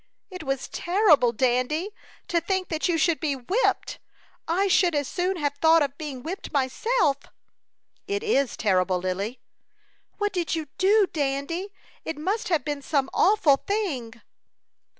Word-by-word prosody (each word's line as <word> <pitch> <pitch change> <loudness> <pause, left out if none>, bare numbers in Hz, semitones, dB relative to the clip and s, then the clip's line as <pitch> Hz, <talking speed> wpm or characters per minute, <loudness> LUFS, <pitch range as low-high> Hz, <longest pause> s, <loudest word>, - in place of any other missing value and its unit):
It 365 -1 -7
was 270 -3 -3
terrible, 345 - +3
Dandy! 255 - 0 0.4
To 340 -1 +1
think 375 +2 -2
that 320 +2 -1
you 335 - +2
should 325 0 +2
be 295 -3 -1
whipped! 365 - -1 0.5
I 375 +5 +1
should 355 -3 +3
as 285 -2 0
soon 365 +1 -1
have 290 -3 -1
thought 325 -1 +6
of 280 -1 -3
being 280 -5 -6
whipped 360 +5 -6
myself." 290 - +1 0.9
"It 405 +1 -2
is 280 - +1
terrible, 185 -3 +2
Lily." 190 +6 -3 0.8
"What 410 -1 -1
did 345 -3 -1
you 315 -3 -4
do, 405 +2 +5
Dandy? 295 +6 -2 0.3
It 320 - -5
must 385 +9 -2
have 320 -7 +1
been 290 -1 -3
some 275 -1 -1
awful 360 -9 +4
thing." 275 - -3
315 Hz, 150 wpm, -25 LUFS, 270-370 Hz, 0.9 s, thought